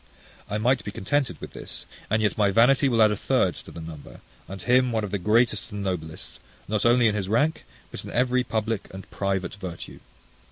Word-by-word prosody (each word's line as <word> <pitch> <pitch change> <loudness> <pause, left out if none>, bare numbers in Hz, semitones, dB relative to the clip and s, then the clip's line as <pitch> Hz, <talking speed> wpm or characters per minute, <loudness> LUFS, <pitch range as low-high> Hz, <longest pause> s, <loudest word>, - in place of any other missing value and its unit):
I 105 - -1
might 125 +5 +2
be - - -5
contented 135 +8 -1
with - - -8
this, - - -7 0.2
and 110 +1 +2
yet 105 -4 +1
my 105 -2 +3
vanity 125 +7 +4
will 115 -3 +4
add 110 - +5
a - - 0
third - - +1
to - - -10
the - - -9
number; 80 -3 -10 0.3
and 95 +3 -7
him 125 +2 +3
one 110 -2 0
of 100 - -4
the 100 - -1
greatest 110 +1 +2
and 100 -1 -4
noblest, 80 -5 -5 0.3
not 105 +2 +1
only 120 0 +5
in 110 - +2
his 100 -2 -2
rank, 145 +9 +1 0.3
but - - -7
in - - -8
every 125 +1 +2
public 110 -3 -2
and 95 0 -9
private 95 -1 -2
virtue. 90 -4 -8
105 Hz, 210 wpm, -25 LUFS, 95-120 Hz, 0.3 s, add